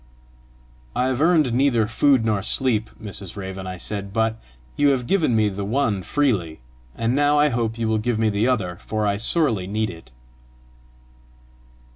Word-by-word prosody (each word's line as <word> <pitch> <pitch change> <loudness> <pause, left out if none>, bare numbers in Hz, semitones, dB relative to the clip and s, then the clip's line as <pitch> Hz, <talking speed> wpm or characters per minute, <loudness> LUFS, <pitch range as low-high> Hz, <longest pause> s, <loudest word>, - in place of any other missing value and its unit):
"I 125 +1 +1
have 130 +1 -1
earned 155 -7 +3
neither 120 -3 +2
food 120 +2 +2
nor 105 -3 +1
sleep, 110 0 +1
Mrs. 100 -4 -7
Raven," 95 -1 -6
I 90 0 -5
said, 100 +2 -6
"but 110 +1 -1 0.3
you 145 0 +3
have 130 -3 0
given 160 -7 +1
me 110 -1 +3
the 100 0 -4
one 110 -2 0
freely, 100 - -1 0.4
and 115 +2 0
now 145 +1 +3
I 150 0 +4
hope 115 -3 -2
you 115 -1 -1
will 110 0 +1
give 115 +1 -1
me 110 0 +2
the 105 +3 +1
other, 95 -9 -1
for 110 +2 -3
I 100 -1 +1
sorely 115 - +1
need 110 +2 -1
it." 80 -6 -14
110 Hz, 170 wpm, -22 LUFS, 100-130 Hz, 0.4 s, I